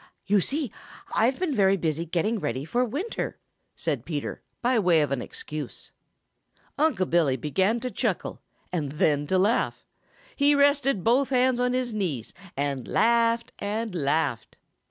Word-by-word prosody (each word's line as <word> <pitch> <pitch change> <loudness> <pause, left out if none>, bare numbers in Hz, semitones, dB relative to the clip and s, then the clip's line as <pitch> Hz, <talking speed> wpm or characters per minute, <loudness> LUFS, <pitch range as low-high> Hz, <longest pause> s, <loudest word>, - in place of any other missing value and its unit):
"You 200 0 +3
see, 275 - -1 0.4
I've 245 +4 +2
been 360 -5 -1
very 195 -4 +4
busy 165 -1 -2
getting 205 +7 0
ready 130 -3 -3
for 240 +10 +1
winter," 290 - -3 0.4
said 145 -8 -2
Peter, 150 -1 -4 0.2
by 245 -1 +3
way 175 -5 +4
of 145 - 0
an 135 -3 -1
excuse. 150 0 -7 0.8
Unc' 295 - +1
Billy 155 -6 +3
began 190 - +1
to 250 0 -3
chuckle - - -2 0.3
and 150 -6 -2
then 145 -1 +1
to 190 - +2
laugh. 205 +6 +1 0.5
He 285 0 +4
rested 280 - +3
both 255 +4 +3
hands 255 -1 +2
on 250 0 +1
his 250 -2 -1
knees 165 - -3 0.2
and 140 -3 -2
laughed 230 0 +2
and 215 +1 -3
laughed. 145 -5 -1
200 Hz, 150 wpm, -26 LUFS, 155-250 Hz, 0.8 s, very